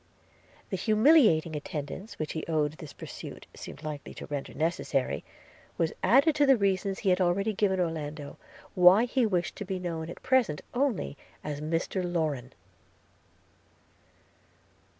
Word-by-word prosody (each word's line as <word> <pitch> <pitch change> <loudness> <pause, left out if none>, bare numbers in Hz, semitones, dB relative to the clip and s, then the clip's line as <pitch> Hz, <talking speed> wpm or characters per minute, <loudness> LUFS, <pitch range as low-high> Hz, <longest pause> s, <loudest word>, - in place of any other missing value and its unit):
The 190 - 0
humiliating 215 - +4
attendance 150 +7 -6
which 155 - -3
he 160 - -3
owned 155 -2 +1
this 155 -2 -10
pursuit - - -9
seemed 150 - -9
likely 150 -2 -6
to - - -7
render 145 -2 -5
necessary, 140 - -1 0.5
was 165 -1 0
added 275 - +5
to 290 -1 +4
the 270 -2 +6
reasons 195 -1 0
he 195 - +1
had 180 +1 +2
already 195 +4 +1
given 190 -2 +1
Orlando, 155 -4 -3 0.4
why 185 +5 +7
he 245 -1 +1
wished 180 -4 -1
to - - -4
be 190 -1 -3
known 165 -3 -4
at - - -10
present 250 - +2
only 245 - 0 0.3
as 145 -1 -4
Mr 165 +4 -1
Lorrain. 155 -8 -2
175 Hz, 140 wpm, -29 LUFS, 155-205 Hz, 0.5 s, why